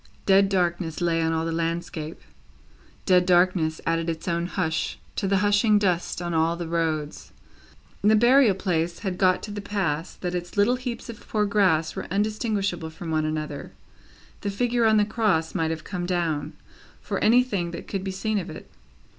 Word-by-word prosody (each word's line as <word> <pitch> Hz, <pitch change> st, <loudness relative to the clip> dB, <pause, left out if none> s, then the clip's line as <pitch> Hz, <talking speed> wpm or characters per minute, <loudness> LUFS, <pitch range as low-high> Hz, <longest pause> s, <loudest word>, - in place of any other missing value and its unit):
Dead 195 Hz, 0 st, +5 dB
darkness 175 Hz, -3 st, 0 dB
lay 170 Hz, -2 st, +1 dB
on 160 Hz, 0 st, +1 dB
all 160 Hz, 0 st, 0 dB
the 165 Hz, -, -2 dB
landscape, 165 Hz, -1 st, -3 dB, 0.9 s
dead 180 Hz, -2 st, +5 dB
darkness 175 Hz, -3 st, +2 dB
added 165 Hz, 0 st, 0 dB
its 160 Hz, +1 st, -5 dB
own 170 Hz, 0 st, 0 dB
hush 160 Hz, -4 st, -2 dB, 0.2 s
to 195 Hz, -, -1 dB
the 195 Hz, 0 st, +2 dB
hushing 205 Hz, +1 st, +4 dB
dust 180 Hz, -3 st, 0 dB
on 175 Hz, 0 st, -3 dB
all 165 Hz, +1 st, +2 dB
the 170 Hz, -1 st, -5 dB
roads. 160 Hz, -3 st, -2 dB, 0.7 s
The 215 Hz, +1 st, +5 dB
burial 240 Hz, -1 st, +5 dB
place 170 Hz, -3 st, -1 dB
had 185 Hz, -2 st, -2 dB
got 185 Hz, -2 st, +3 dB
to 210 Hz, -, -6 dB
the 205 Hz, 0 st, -5 dB
pass 185 Hz, -5 st, -2 dB
that 180 Hz, -1 st, -4 dB
its 175 Hz, +2 st, -5 dB
little 225 Hz, +5 st, +3 dB
heaps 250 Hz, -2 st, -5 dB
of 230 Hz, -2 st, -10 dB
poor 210 Hz, -1 st, +1 dB
grass 190 Hz, -6 st, +2 dB
were -, -, -5 dB
undistinguishable 200 Hz, -4 st, -1 dB
from 160 Hz, +1 st, -7 dB
one 155 Hz, -1 st, +1 dB
another; 155 Hz, -2 st, -4 dB, 0.7 s
the 205 Hz, -, -2 dB
figure 240 Hz, +3 st, +1 dB
on 220 Hz, -1 st, +5 dB
the 210 Hz, -, +4 dB
Cross 205 Hz, -7 st, 0 dB
might 160 Hz, -1 st, 0 dB
have 160 Hz, -1 st, -4 dB
come 180 Hz, -2 st, -4 dB
down, 170 Hz, -5 st, -1 dB, 0.5 s
for -, -, -3 dB
anything 220 Hz, -6 st, +3 dB
that 170 Hz, -, -8 dB
could 195 Hz, -2 st, -3 dB
be 195 Hz, -, -3 dB
seen 210 Hz, +3 st, -1 dB
of 180 Hz, -1 st, -6 dB
it. 155 Hz, -, -10 dB
180 Hz, 180 wpm, -25 LUFS, 165-205 Hz, 0.9 s, Dead